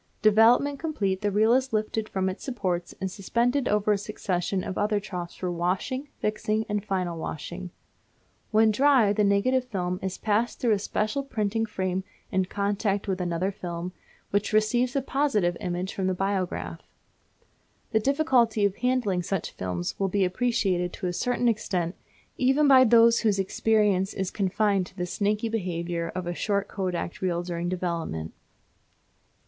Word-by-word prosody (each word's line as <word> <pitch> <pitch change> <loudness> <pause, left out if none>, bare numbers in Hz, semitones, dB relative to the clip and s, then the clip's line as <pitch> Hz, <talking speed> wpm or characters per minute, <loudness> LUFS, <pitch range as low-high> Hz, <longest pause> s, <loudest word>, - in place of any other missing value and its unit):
Development 235 +7 +5
complete, 200 - -1
the 205 - +1
reel 215 +3 +3
is 260 -1 +1
lifted 215 0 -1
from 190 -1 -1
its 185 - -4
supports 185 -9 -2
and 190 -1 -3
suspended 240 +8 0
over 210 0 +2
a 205 - +2
succession 190 -2 -2
of 185 - -4
other 210 0 +1
troughs 180 -4 -6
for 180 -1 -3
washing, 185 +11 -2
fixing, 215 +1 -1
and 210 -1 -1
final 185 -5 -2
washing. 175 +4 -6 0.8
When 220 0 +4
dry 255 -3 +4
the 210 0 +2
negative 245 +6 +2
film 180 -6 -2
is 190 -1 -3
passed 220 +3 0
through 240 - +2
a 210 - +3
special 215 +6 -1
printing 225 -4 -1
frame 185 -2 -2 0.3
in 190 -1 +1
contact 200 +1 -1
with 190 -1 -1
another 175 +2 -1
film, 175 -1 -5 0.4
which 205 +2 0
receives 240 +4 +2
the 275 - 0
positive 260 -12 +1
image 180 -1 -3
for 195 - -3
the 185 0 +1
biograph. 180 - -2 1.1
The 220 - +3
difficulty 245 -5 +2
of 200 -1 0
handling 240 -7 +1
such 190 0 -3
films 90 -1 -4
will 195 -1 +1
be 195 0 +2
appreciated 185 -3 0
to - - -6
a 175 - -1
certain 245 +5 0
extent 185 -6 0 0.5
even 270 +3 +4
by 260 -2 +8
those 230 0 +6
whose 210 -3 +2
experience 200 0 +1
is 190 -1 -2
confined 200 -1 +1
to 185 - -19
the 180 - -1
snaky 210 +4 0
behaviour 175 -5 -2
of 185 -1 -3
a 175 - -2
short 200 +2 -1
Kodak 180 -3 -3
reel 175 -2 0
during 175 0 -3
development. 170 - -3
200 Hz, 160 wpm, -26 LUFS, 180-225 Hz, 1.1 s, by